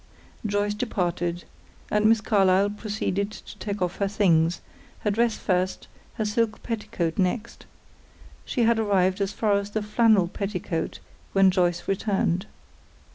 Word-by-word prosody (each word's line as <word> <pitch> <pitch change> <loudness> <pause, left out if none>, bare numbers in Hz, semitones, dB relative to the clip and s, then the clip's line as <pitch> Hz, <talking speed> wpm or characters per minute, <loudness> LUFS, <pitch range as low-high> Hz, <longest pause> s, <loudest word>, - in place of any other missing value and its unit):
Joyce 205 0 0
departed, 175 -6 -2 0.5
and 210 0 +2
Miss 225 0 +5
Carlyle 200 -2 +3
proceeded 205 -2 -2
to 215 - -11
take 205 -2 -3
off 180 0 -2
her 200 - +1
things; 175 -5 +2 0.4
her 210 - +1
dress 230 +2 +1
first, 185 -1 -1 0.3
her 220 - -1
silk 215 +1 -1
petticoat 205 -7 -3
next. 210 +5 -2 0.8
She 245 - -1
had 230 0 +3
arrived 195 -2 +2
as 195 0 0
far 210 -1 +1
as 200 0 -6
the 215 0 -2
flannel 210 -3 +4
petticoat 180 -4 -3 0.4
when 195 -1 +5
Joyce 175 -2 0
returned. 195 -2 0
200 Hz, 135 wpm, -25 LUFS, 185-215 Hz, 0.8 s, Miss